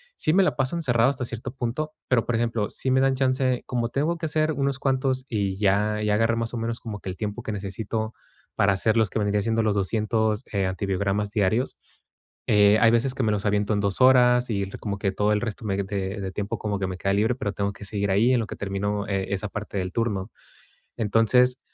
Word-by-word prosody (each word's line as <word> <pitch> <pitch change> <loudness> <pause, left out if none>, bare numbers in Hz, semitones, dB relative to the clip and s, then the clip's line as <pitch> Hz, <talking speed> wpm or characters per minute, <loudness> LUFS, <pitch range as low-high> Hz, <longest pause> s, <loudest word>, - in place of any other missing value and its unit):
Sí 155 - +1
me 195 +1 +5
la 145 -8 +1
paso 135 +6 -1
cerrado 120 -3 +3
hasta 130 -3 -2
cierto 115 0 -6
punto, 135 +5 -3
pero, 125 -3 +2
por 120 - -1
ejemplo, 115 -2 0
sí 130 - -2
me 130 +1 +4
dan 135 0 +3
chance 130 -1 +1
como 120 -2 -1
tengo 155 +6 0
que 165 - -4
hacer 155 +1 +1
unos 140 -1 -1
cuantos, 130 -1 0
y 100 -4 -1
ya 105 +1 +1
ya 105 -1 +1
agarré, 115 +1 +2
más 115 +1 -3
o - - -3
menos, 115 +1 -3
como 105 -3 -6
que 95 - -7
el 90 - -6
tiempo 105 -1 -4
que - - -4
necesito 105 +2 -4 0.4
para 100 0 +3
hacerlos, 110 +2 +2
que 110 - -2
vendría 105 0 +1
siendo 115 +1 +1
los 105 -2 +1
200, 110 +3 0
eh, 100 -2 0
antibiogramas 100 +2 -1
diarios, 110 +4 0 0.7
eh, 105 0 +5
hay 115 - +6
veces 125 +3 +1
que 130 - -2
me 110 - +2
los 105 -1 -1
aviento 105 +1 +1
en 100 - 0
2 100 +3 -1
horas 125 -1 +5
y 100 -2 0
r 95 - -8
como 100 -2 -4
que 100 -2 0
todo 105 +2 +1
el 105 - +1
resto 110 -1 -5
me 100 -2 -1
de 100 - -1 0.4
de 95 -1 -4
tiempo 100 +1 -3
como 105 -2 -2
que 95 - 0
me 95 - -4
queda 100 +3 0
libre, 110 +5 +2
pero 105 -6 -3
tengo 100 +1 -2
que 100 - -11
seguir 100 0 -1
ahí 115 +6 +4
en - - +3
lo 110 - -3
que - - -7
termino 100 +1 -2
eh 95 -2 -1
esa 100 +1 -1
parte 105 0 -5
del 90 0 -3
turno. 110 -3 -1 0.7
Entonces, 115 +3 +3
110 Hz, 235 wpm, -25 LUFS, 100-125 Hz, 0.7 s, hay